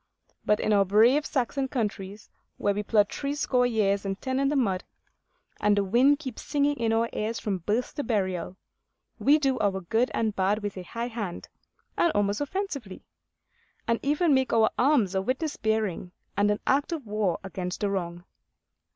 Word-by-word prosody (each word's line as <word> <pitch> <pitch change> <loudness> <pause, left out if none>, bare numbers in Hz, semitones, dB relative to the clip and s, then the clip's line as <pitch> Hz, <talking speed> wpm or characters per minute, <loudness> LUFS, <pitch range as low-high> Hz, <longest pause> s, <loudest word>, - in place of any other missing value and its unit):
But 210 - +2
in 215 - +1
our 200 -1 +5
brave 230 +10 +4
Saxon 270 -1 -1
countries, 210 -5 -4 0.3
where 205 - +1
we 205 - -2
plod 210 -1 +3
threescore 280 -3 0
years 200 -4 +1
and 195 -1 -3
ten 260 0 -2
in 275 0 +2
the 295 - 0
mud, 195 -9 +1 0.8
and 205 0 +3
the 200 - +3
wind 250 +9 +4
keeps 265 -6 -7
singing 290 0 +1
in 230 -2 0
our 225 +1 +2
ears 220 +2 -2
from 195 -3 -2
birth 215 +8 -1
to 290 - -3
burial, 190 -6 -2 0.6
we 290 +2 +5
do 270 -4 0
our 195 -2 +1
good 225 +8 0
and 220 -2 0
bad 200 +3 +1
with 205 -1 -3
a 185 - -6
high 230 +6 -5
hand 210 -7 -5 0.5
and 340 - +3
almost 205 +2 0
offensively; 285 - -4 0.8
and 230 0 +1
make 280 - -2
even 295 -3 +3
our 220 -1 +4
alms 250 -8 +3
a 190 - +1
witness 265 +8 -2
bearing 215 -5 -1 0.2
and 205 +1 +2
an 210 - 0
act 280 +5 +1
of 315 -6 -4
war 205 -4 0
against 185 -1 -5
the 205 - +1
wrong. 175 -2 -3
220 Hz, 180 wpm, -27 LUFS, 200-265 Hz, 0.8 s, our